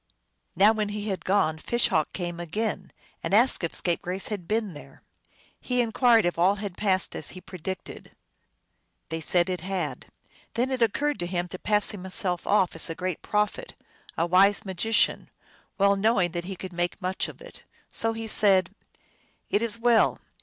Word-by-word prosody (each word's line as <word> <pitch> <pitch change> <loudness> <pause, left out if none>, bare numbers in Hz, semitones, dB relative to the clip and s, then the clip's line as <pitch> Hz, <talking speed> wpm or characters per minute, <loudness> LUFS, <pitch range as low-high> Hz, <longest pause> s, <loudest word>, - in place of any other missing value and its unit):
Now 205 +3 +6
when 215 -2 -1
he 210 +1 -4
had 190 - -3
gone 185 -5 +1
Fish 240 +8 +1
Hawk 155 - +1
came 175 -2 -4
again, 195 +3 -3 0.3
and 165 +4 0
asked 240 -2 +4
if 170 - -2
Scapegrace 180 +2 -2
had 200 -6 -5
been 215 -2 -1
there. 135 -2 -13 0.6
He 250 -1 -1
inquired 235 -1 +4
if 175 -1 -1
all 185 +4 +4
had 200 -3 -6
passed 190 -3 0
as 150 - -5
he - - -6
predicted. 185 0 -8 1.0
They 160 0 -3
said 175 +2 +2
it 180 -3 -3
had. 190 0 -3 0.5
Then 250 +3 0
it 260 -2 -2
occurred 285 +7 +1
to 175 - -2
him 175 0 -2
to 185 - -7
pass 210 -1 +1
himself 185 -2 -3
off 195 -4 +3
for 165 0 -3
a - - -5
great 185 -1 -3
prophet, 210 - -1 0.4
a 165 - +2
wise 195 +5 +4
magician, 195 +4 +1 0.5
well 200 0 +4
knowing 195 -3 +2
that 170 0 -4
he 195 +1 -5
could 185 0 -8
make 175 +2 -2
much 185 0 -2
of - - -11
it. - - -8 0.3
So 225 0 +1
he 225 0 -5
said, 195 -4 +4 0.4
" - - -39
It 205 - +2
is 230 -1 0
well. 230 -1 +3
195 Hz, 180 wpm, -26 LUFS, 175-220 Hz, 1.0 s, Now